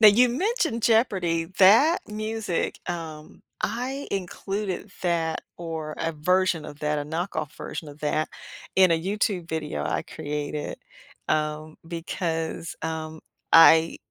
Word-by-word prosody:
Now 215 - +11
you 245 +5 +6
mentioned 300 - 0
Jeopardy, 185 -8 +2
that 230 - +7
music, 215 -3 -2
um, 160 0 -6 0.2
I 265 +4 -2
included 195 +1 -3
that 165 -2 0 0.2
or 160 -3 -5
a 165 0 -1
version 180 +1 +1
of 145 - -9
that 150 0 0
a 145 - -3
knockoff 160 -1 -3
version 155 - -6
of 145 +1 -12
that, 155 +1 0 0.5
in 185 -2 +6
a 165 - +1
YouTube 190 -3 -1
video 150 - -3
I - - -1
created, 150 0 -4 0.5
um, 155 0 -1
because, 165 -1 -3
um, 160 -1 -4 0.3
I 165 0 +8
165 Hz, 130 wpm, -26 LUFS, 155-205 Hz, 0.5 s, Now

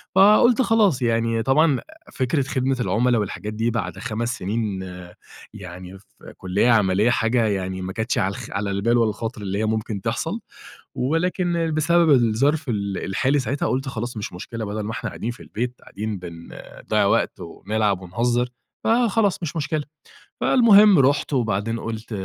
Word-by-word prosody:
فَقُلت 215 +6 +6
خلاص 215 - +3
يعني 115 -1 +1
طبعًا 140 +2 +3
أ 315 0 -18
فكرة 135 +2 0
خدمة 130 0 -1
العملاء 120 +3 +2
والحاجات 105 +1 -5
دي 115 +2 0
بعد 115 - -3
5 115 +3 -3
سنين 100 0 -2 0.7
يعني 90 +2 -10
في - - -16
كلية 95 +6 +1
عملية 105 0 +3
حاجة 115 0 +2
يعني 95 -2 -2
ما 95 +1 -5
كانتش 110 +3 -2
على 95 - +1
الخ - - -8
على 100 0 -2
البال 110 +5 +1
ولا 115 -2 +3
الخاطر 110 0 -5
اللي 100 -1 -3
هي 110 - 0
ممكن 110 -2 -2
تحصل - - -2 0.6
ولكن 170 +3 0
بسبب 165 +2 +3
الظرف 135 +3 +2
ال 100 -3 -2
الحالي 135 +9 +1
ساعتها 135 +3 -2
قُلت 135 +2 -1
خلاص 120 -2 -5
مش 105 - -5
مشكلة 110 +5 -6
بدل 105 +1 -4
ما 105 +1 -4
إحنا 115 - -4
قاعدين 115 - -4
في 120 - -12
البيت 125 +3 -4
قاعدين 105 0 -5
بن 85 -2 -10 0.3
بنضَيَّع - - +1
وقت - - +1
وبنلعَب 100 +3 -2
ونهزر 120 +7 0 0.3
فَخلاص 225 -5 +2
مش 165 - -4
مشكلة. 155 -1 -2 0.6
فالمهم 210 - +6
رُحت 140 +2 +2
وبعدين 115 -2 0
قُلت 115 0 -6
115 Hz, 160 wpm, -22 LUFS, 105-145 Hz, 0.7 s, فَقُلت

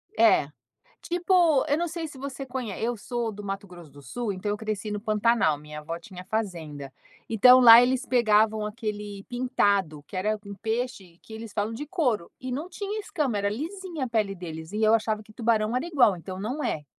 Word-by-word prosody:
É, 220 -10 +5 0.5
tipo 345 -4 +3
eu 290 +2 +2
não 345 - -1
sei 330 0 -4
se 290 -3 -11
você 275 0 -6
conhe 250 -4 -5
eu 240 0 -1
sou 235 +1 -3
do 205 0 -9
Mato 195 0 -5
Grosso 175 -4 -13
do 145 +1 -15
Sul 210 - -3
então 190 +2 -4
eu 205 - -1
cresci 215 0 -4
no 210 0 -3
Pantanal, 215 -6 +2
minha 150 0 -9
avó 165 +2 -5
tinha 180 +1 -11
fazenda. 165 -10 -4 0.4
Então 250 +4 +7
lá 235 -1 +10
eles 255 +1 +1
pegavam 220 -3 +3
aquele 210 -2 -5
pintado, 200 -10 0
que - - -8
era 215 +3 0
um 200 - -7
peixe 220 -5 -4
que - - -14
eles 220 -1 -8
falam 210 +2 -1
de 295 +6 -6
couro, 255 - -1
e 255 0 -5
não 300 +8 -4
tinha 405 +3 -5
escama, 285 - -2
era 200 0 0
lisinha 330 - -4
a - - -5
pele 215 -4 0
deles 160 -1 -8
e 215 - -2
eu 220 +1 +5
achava 215 -1 0
que 215 - -18
tubarão 220 0 +1
era 260 - -1
igual, 250 - +4
então 185 +2 -8
não 255 +9 -3
é? 150 - -2
220 Hz, 205 wpm, -26 LUFS, 200-255 Hz, 0.5 s, lá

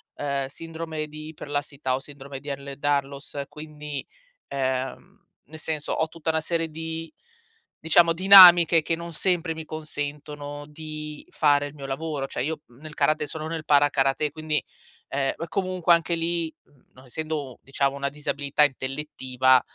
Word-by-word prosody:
ehm, 140 -1 -2
sindrome 160 +1 -6
di 155 0 -9
iperlassità 145 -3 -3
o - - -3
Sindrome 140 -1 -10
di 145 - -15
Ehlers-Danlos 140 0 -2
quindi, 150 -2 -7 0.4
ehm, 130 -1 -3 0.2
nel 160 +2 -10
senso 155 -2 -3
ho 160 - +1
tutta 160 0 -5
una 160 0 +2
serie 165 0 -1
di, 160 +1 -6 0.7
diciamo, 165 +1 +5
dinamiche 175 -3 +9
che 165 - 0
non 170 +1 -7
sempre 170 -1 0
mi 160 0 -7
consentono 145 -1 -6
di 155 0 -8
fare 145 -2 +3
il 145 - -7
mio 140 -2 -9
lavoro. 140 0 -3
Cioè 125 - -3
io 155 +2 -3
nel 150 +6 -12
karate 155 0 +1
sono 155 +1 -5
nel 160 -1 -4
Para-Karate 145 0 +3
quindi, 155 -1 -1 0.5
ehm, 135 0 0 0.2
comunque, 185 -1 0
anche 170 0 +2
lì, 165 -1 -1 0.4
non 130 0 -16
essendo, 150 -1 -4
diciamo, 140 0 0
una 140 0 -2
disabilità 145 0 0
intellettiva, 130 -2 +2
150 Hz, 145 wpm, -25 LUFS, 140-160 Hz, 0.7 s, dinamiche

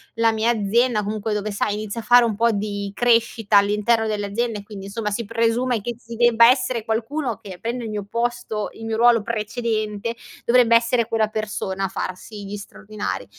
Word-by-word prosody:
la 230 0 +3
mia 220 +2 +2
azienda, 225 +1 +1
comunque 215 +1 -2
dove, 210 0 -2
sai, 205 +1 -1
inizio 215 +2 -5
a - - -16
fare 245 +2 +6
un 220 -3 -1
pò 235 +2 +3
di 200 -1 -3
crescita 230 -3 +2
all'interno 210 +3 +2
dell'azienda 210 +2 -2
e - - -11
quindi, 205 -2 -9
insomma, 210 +1 -3
si 220 +3 -2
presume 230 +2 0
che 240 +3 -5
ci 235 -1 -10
debba 235 -1 +6
essere 250 -3 +1
qualcuno 230 +2 -2
che 195 -5 -10
prenda 235 +1 -3
il - - -5
mio 210 -2 -3
posto, 235 -2 -2
il 225 - -11
mio 220 0 -2
ruolo 235 -1 +5
precedente, 215 0 -2 0.3
dovrebbe 235 -1 +5
essere 235 0 +2
quella 225 -2 +1
persona 200 -3 -3
a - - 0
farsi 200 +3 -6
gli 200 +1 -5
straordinari. 205 - -6
225 Hz, 190 wpm, -22 LUFS, 210-235 Hz, 0.3 s, fare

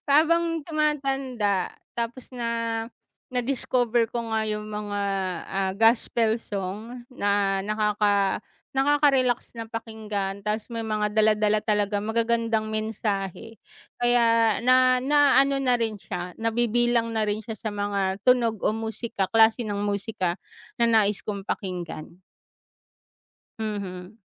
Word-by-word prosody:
Habang 330 +2 +3
tumatanda, 270 - 0 0.2
tapos 235 +2 -4
na 245 -2 -4 0.8
na-discover 245 -2 +1
ko 235 -1 -4
nga 220 0 0
'yong 210 0 -3
mga, 210 -1 -3 0.5
ah, 190 0 0
gospel 225 +1 +3
song 215 +4 -6
na 200 -4 +1
nakaka 210 -2 +1 0.3
nakaka-relax 270 -3 +2
na 225 - -4
pakinggan. 215 -3 -5
Tapos 210 +2 -2
may 230 -1 -4
mga 210 -1 0
dala-dala 215 0 +3
talagang 205 -1 0
magagandang 230 -1 0
mensahe. 215 -1 -3 0.4
Kaya, 230 -3 +3
na 255 0 +4
naano 275 -1 +4
na 255 -2 +2
rin 225 -3 -1
siya, 180 -1 -6
nabibilang 235 +1 +1
na 220 -1 0
rin 210 +1 -2
siya 220 +1 -6
sa 220 - -4
mga 200 -1 -1
tunog 235 -4 +3
o - - +3
musika, 220 -2 -3
klase 225 +1 +5
ng 205 -1 -2
musika 200 -3 -2 0.4
na 235 - +4
nais 215 -3 +3
kong 200 -2 -3
pakinggan. 175 -3 -5 1.4
Mhm. 200 -2 -5
220 Hz, 115 wpm, -25 LUFS, 205-240 Hz, 1.4 s, klase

